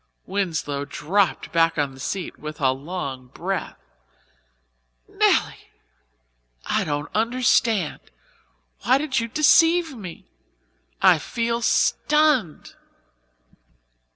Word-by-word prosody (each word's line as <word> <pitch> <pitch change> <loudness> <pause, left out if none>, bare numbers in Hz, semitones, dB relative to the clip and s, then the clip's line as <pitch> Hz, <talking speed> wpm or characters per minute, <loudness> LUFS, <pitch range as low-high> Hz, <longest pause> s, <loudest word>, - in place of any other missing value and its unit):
Winslow 160 -7 -2
dropped 190 +7 -1
back 165 -1 +2
on 145 -2 -1
the 130 - -15
seat 185 +6 -5
with 155 0 -8
a 130 -2 +3
long 135 -2 -6
breath. 180 +8 -4 1.3
"Nelly, - - 0 1.0
I - - 0
don't 145 -1 -4
understand. 230 -5 +1 0.8
Why 255 +5 +3
did 275 -2 -1
you 230 - -2
deceive 325 +4 +3
me? 185 -7 -10 0.8
I - - +6
feel 235 0 -2
stunned." 295 - +1
195 Hz, 95 wpm, -23 LUFS, 150-245 Hz, 1.3 s, I